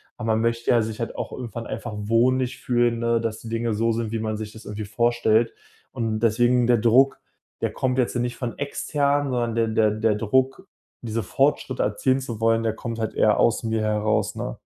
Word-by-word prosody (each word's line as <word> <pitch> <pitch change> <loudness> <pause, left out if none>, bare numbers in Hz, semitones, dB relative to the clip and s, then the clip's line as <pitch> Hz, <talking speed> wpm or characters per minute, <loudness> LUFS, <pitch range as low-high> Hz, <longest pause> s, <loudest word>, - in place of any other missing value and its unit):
Aber 115 - -5
man 110 0 +2
möchte 115 0 -1
ja 120 - +5
sich 110 +1 -5
halt 115 - -4
auch - - -5
irgendwann 115 -2 -6
einfach 120 - -5
wohnlich 125 +4 +1
fühlen, 120 -1 +1
ne, 115 0 +1
dass 115 -1 -3
die 115 - -9
Dinge 115 0 -1
so 115 +2 +1
sind, 115 -1 -2
wie 115 - -2
man 110 -1 -2
sich 110 0 -7
das 110 - -13
irgendwie 105 0 -5
vorstellt. 115 +1 +2 0.4
Und 110 -2 -2
deswegen 120 +2 +3
der 120 -1 +4
Druck, 120 +5 +4 0.4
der - - -1
kommt 130 0 -1
jetzt 125 -1 +1
nicht 120 0 -2
von 120 -3 -4
extern, 145 0 0
sondern 120 -2 -1
der 115 -1 +2 0.2
der - - -1
der 110 0 +1
Druck, 130 +5 0 0.3
diese 115 -1 -3
Fortschritte 135 +5 0
erzielen 130 +6 +1
zu 120 -5 -6
wollen, 115 0 +3
der 110 -1 0
kommt 115 0 -5
halt 110 - -3
eher 105 - +3
aus 115 - +2
mir 110 -1 -1
heraus, 105 0 0
ne? - - -5
115 Hz, 210 wpm, -24 LUFS, 110-120 Hz, 0.4 s, ja